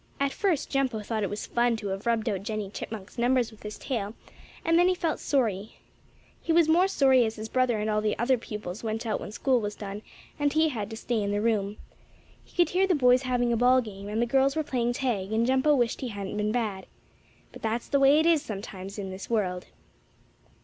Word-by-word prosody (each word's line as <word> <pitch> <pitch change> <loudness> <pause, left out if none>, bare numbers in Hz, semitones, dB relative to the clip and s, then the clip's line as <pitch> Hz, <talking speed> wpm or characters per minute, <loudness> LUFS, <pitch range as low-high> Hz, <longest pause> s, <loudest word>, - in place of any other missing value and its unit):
At 280 0 +1
first 360 -8 0
Jumpo 260 -6 0
thought 220 -1 -2
it 200 - -1
was 205 - -4
fun 240 0 +1
to 205 -2 -5
have 195 +4 -4
rubbed 230 -1 +1
out 200 -4 -1
Jennie 210 -2 -4
Chipmunk's 215 0 -7
numbers 245 -1 +2
with 220 - -17
his 210 0 -7
tail, 220 -5 -3 0.5
and 330 +1 +4
then 355 - +5
he 370 - +2
felt 330 -3 -1
sorry. 220 -7 -1 0.7
He 335 - -2
was 330 -1 +5
more 345 +4 +4
sorry 265 -8 +4
as 220 -1 -2
his 215 0 -6
brother 255 -1 +1
and 210 0 -2
all 215 0 +1
the 215 0 0
other 250 +3 +3
pupils 210 -2 -7
went 225 +1 -3
out 220 - -1
when - - -7
school 250 +2 +1
was 205 -1 -4
done, 205 0 -6 0.4
and 290 -1 +1
he 315 +1 +3
had 215 -7 -4
to 220 - -7
stay 230 -1 -1
in 200 - -1
the 205 0 0
room. 210 -2 0 0.7
He - - -24
could 345 -3 +3
hear 375 +2 +3
the 365 - +3
boys 250 -2 +4
having 245 -2 +1
a - - +2
ball 250 +2 +5
game, 200 -4 -7
and 215 +2 -2
the 240 - +3
girls 270 +3 +2
were 315 - 0
playing 245 -4 -1
tag, 225 -7 -2
and 225 +1 +2
Jumpo 265 +4 +3
wished 240 -2 0
he 260 - -2
hadn't 200 -3 -5
been 210 0 0
bad. 215 -5 -2 0.6
But - - -12
that's 225 +2 -2
the 280 - +2
way 275 +2 +6
it 315 - +2
is 330 -3 +4
sometimes 195 -5 -7
in 195 -2 -5
this 190 +1 -8
world. 185 -6 -1
230 Hz, 235 wpm, -27 LUFS, 210-265 Hz, 0.7 s, way